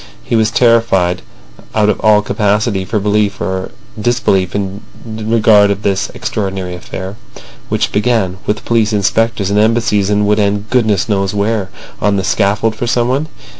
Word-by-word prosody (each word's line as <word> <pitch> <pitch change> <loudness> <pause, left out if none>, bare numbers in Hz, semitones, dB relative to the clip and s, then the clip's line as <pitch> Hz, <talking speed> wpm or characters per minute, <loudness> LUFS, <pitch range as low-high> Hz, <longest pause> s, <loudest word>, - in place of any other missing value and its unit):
He - - -2
was 110 -1 +3
terrified 115 -7 +2 0.5
out 105 -1 +3
of 105 - +1
all 105 -1 +4
capacity 105 -1 0
for 105 +3 -1
belief 105 0 0
or 95 -1 -3 0.3
disbelief 105 -6 +1
in 100 0 -3 0.2
regard 110 -2 +3
of 100 +1 -2
this 100 +1 0
extraordinary 95 -4 -3
affair, 95 +2 -7 0.5
which - - 0
began 105 -4 0
with 105 +1 -2
police 115 -2 +1
inspectors 105 0 0
and 105 - +2
Embassies 110 -2 +2
and 105 0 +2
would 105 +1 +2
end 105 +1 -1
goodness 110 -7 +2
knows 100 -2 -1
where—on 105 -1 -2
the 95 - -1
scaffold 105 +3 +1
for 120 - -3
someone. 125 +6 0
105 Hz, 150 wpm, -14 LUFS, 100-110 Hz, 0.5 s, all